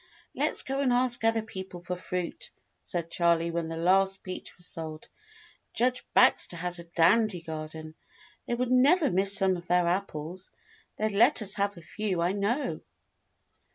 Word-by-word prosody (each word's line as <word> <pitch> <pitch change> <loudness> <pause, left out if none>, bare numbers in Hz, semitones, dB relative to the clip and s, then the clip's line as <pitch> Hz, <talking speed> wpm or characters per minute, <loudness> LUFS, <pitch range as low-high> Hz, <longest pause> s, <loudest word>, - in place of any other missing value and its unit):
'" - - -32
"Let's - - +3
go 270 +1 -3
and 270 -3 +2
ask 245 -1 +3
other 225 0 +2
people 190 -4 -8
for 180 0 -3
fruit," 180 -1 -5 0.3
said 170 -2 -4
Charley 170 -1 +2
when 170 -1 -2
the 165 0 -5
last 190 +3 +2
peach 185 -1 -8
was 175 - -8
sold. 160 -3 -5 0.7
"Judge 250 +1 +1
Bax 255 +1 +5
ter 170 - -9
has 175 +1 -3
a 170 - -9
dandy 180 +4 +3
garden. 155 -1 -7 0.5
They 240 - 0
would 250 +1 -2
never 280 +4 +4
miss 195 +2 +2
some 190 -2 +2
of 175 0 -11
their 180 0 +3
apples. 180 -1 -3 0.5
They'd 215 0 0
let 230 +4 +4
us 200 -1 0
have 200 -1 -1
a 170 - -12
few, 200 0 -3
I 170 +2 +1
know." 205 +8 -1
185 Hz, 175 wpm, -28 LUFS, 170-225 Hz, 0.7 s, Bax